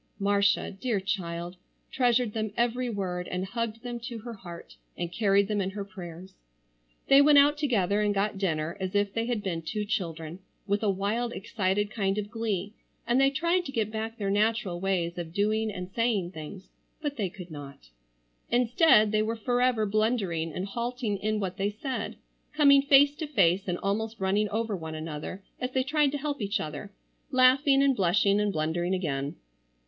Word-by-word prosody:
Marcia, 200 0 +2
dear 205 +2 -1
child, 175 -2 -4 0.3
treasured 245 -3 +2
them 215 -2 -2
every 240 +1 +1
word 180 -4 -3
and 180 +1 -3
hugged 230 +2 -4
them 240 -1 -5
to 235 0 -6
her 235 +2 -7
heart, 175 -5 -11 0.2
and 175 -1 -3
carried 200 -1 +3
them 210 -1 0
in 190 - -1
her 200 +1 -5
prayers. 185 -1 -10 0.7
They 275 +1 +7
went 295 0 +6
out 290 +1 +6
together 210 -9 +1
and 210 -1 +2
got 200 0 -1
dinner 160 -4 -1
as 190 +1 -4
if 205 -1 +1
they 230 0 -1
had 235 -4 -1
been 170 -4 -2
two 210 +6 -3
children, 165 -4 -3 0.3
with 205 0 0
a 215 - +1
wild 210 +5 -1
excited 205 -1 -1
kind 195 -2 -1
of 205 -1 -3
glee; 210 -3 -2 0.3
and 240 +3 +3
they 270 - +5
tried 340 +6 +1
to 275 - -5
get 220 -5 -1
back 220 +1 -4
their 200 -2 -1
natural 205 -4 +1
ways 175 -2 -1
of 165 -1 -6
doing 215 +2 +1
and 180 -1 -7
saying 215 -6 0
things, 185 +3 -9 0.3
but 295 -2 -3
they 205 -7 -1
could 180 -2 -11
not. 140 - -10 0.6
Instead 240 -2 +4
they 215 0 +2
were 220 +1 -1
forever 245 0 +1
blundering 200 -6 0
and 180 +5 -4
halting 235 0 -3
in 215 +1 -1
what 190 -2 -3
they 200 0 0
said; 255 +6 -4 0.4
coming 280 -2 +6
face 280 0 +6
to 315 - -4
face 195 - +2
and 175 -1 -1
almost 220 +3 -2
running 200 +2 +1
over 220 0 -1
one 160 -3 -6
another 155 +4 -6 0.2
as 250 - -2
they 260 - +2
tried 290 +1 +2
to 290 - -2
help 285 -2 -3
each 200 0 0
other; 155 +7 -6 0.4
laughing 270 +2 +5
and 275 -1 +3
blushing 200 +1 +3
and 210 -1 +1
blundering 175 +3 -1
again. 145 -6 -2
205 Hz, 185 wpm, -28 LUFS, 185-235 Hz, 0.7 s, They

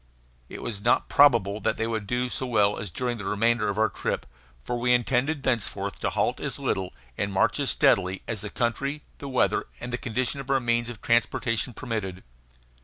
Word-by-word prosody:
It - - -8
was 105 -4 -4
not 120 +3 +2
probable 115 -8 +5
that - - 0
they 115 - 0
would 110 -3 -3
do 125 +2 0
as 125 - -4
well 105 -5 +2
during 120 +6 -3
the 105 - -6
remainder 115 +2 +2
of 100 - -2
our 110 0 +4
trip, - - -3 0.4
for 120 - -2
we 125 +1 +4
intended 135 +4 0
thenceforth 120 -5 -1
to - - 0
halt - - 0
as - - -3
little, 95 -1 -1 0.3
and 100 0 0
march 95 - +2
as - - +1
steadily, 95 0 +3
as 110 -4 -3
the 105 - -5
country, 140 +6 -1 0.2
the 140 - -6
weather, 130 - +2
and 120 - -6
the 125 - -1
condition 125 +4 -1
of 135 -1 -8
our 135 -1 +3
means 120 -1 0
of 120 -3 -9
transportation 115 +1 +1
permitted. 100 -7 -4
115 Hz, 195 wpm, -26 LUFS, 105-125 Hz, 0.4 s, probable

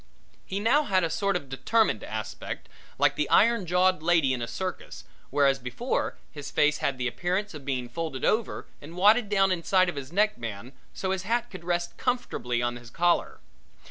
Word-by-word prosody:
He 195 - -2
now 235 +8 +4
had 190 -5 +2
a 165 - 0
sort 200 +3 0
of 160 -6 -3
determined 220 - +1
aspect - - -6 0.3
like - - +3
the - - -1
iron 230 -5 +4
jawed 180 0 +3
lady 160 -5 +3
in 125 - -3
a 120 - -3
circus, 185 +9 -5 0.3
whereas 140 -1 +3
before 130 - -2
his 145 -3 -7
face 150 0 +2
had 135 - -1
the 125 0 -1
appearance 185 - -2
of 145 -3 -9
being 130 -3 -2
folded 155 0 -4
over 220 0 0 0.2
and 160 +4 -10
wadded 210 +3 +5
down 195 -2 +3
inside 185 +1 +2
of 175 - -5
his 140 +1 -6
neck 210 - +2
band, 115 +2 -6 0.2
so 190 - -3
his 190 -1 -1
hat 235 +4 -1
could 185 -3 -9
rest 175 0 -2
comfortably 125 - -1
on 120 0 -1
his 120 -1 -12
collar. 175 +6 +1
175 Hz, 190 wpm, -27 LUFS, 135-200 Hz, 0.3 s, wadded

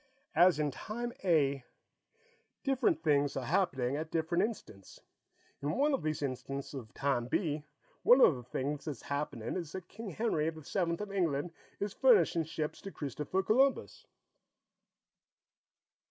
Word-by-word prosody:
As 175 +1 +6
in 150 -2 0
Time 235 - -5
A, 140 -7 +2 1.0
different 255 - +1
things 145 -3 +2
are 130 - -3
happening 135 -5 +1
at 155 +2 -4
different 170 +3 +1
instants. 155 - -6 0.6
In 145 +2 -1
one 290 +2 +3
of 270 - 0
these 155 -1 -2
instants 135 +1 -4
of 120 -5 -7
Time 135 -4 0
B, 150 0 -1 0.4
one 250 - +7
of 165 - +7
the 125 - -7
things 140 +4 -3
that's 145 -7 -5
happening 140 -5 -3
is 170 -4 -4
that 185 -2 -6
King 220 +1 -7
Henry 165 -5 0
the 160 -1 -9
Seventh 170 +3 -1
of 210 -1 -5
England 170 -4 0 0.3
is 205 -1 -2
furnishing 425 - +4
ships 155 -1 -4
to 195 - -7
Christopher 150 +6 -2
Columbus." 270 - +1
155 Hz, 145 wpm, -32 LUFS, 140-195 Hz, 1.0 s, one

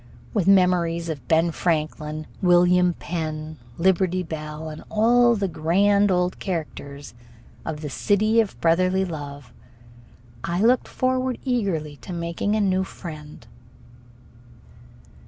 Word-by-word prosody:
With 195 -5 0
memories 175 -3 +3
of 140 -6 -6
Ben 165 +1 +3
Franklin, 155 -2 -2 0.2
William 180 -1 +4
Penn, 155 -2 -5 0.2
Liberty 185 0 +2
Bell, 155 -1 -6
and 155 0 -9
all 235 +2 +4
the 200 -2 -1
grand 200 +5 +2
old 180 0 0
characters 145 - -5 0.5
of 155 -2 -4
the 150 - -4
City 215 +8 +2
of 215 - -5
brotherly 185 +3 +2
Love, 145 -7 -8 0.9
I 170 +1 -2
looked 240 +4 +3
forward 255 -1 -1
eagerly 185 - -1
to 185 - -9
making 170 +5 -2
a 215 - +1
new 190 -1 +2
friend. 155 -5 -10
175 Hz, 120 wpm, -23 LUFS, 155-195 Hz, 0.9 s, William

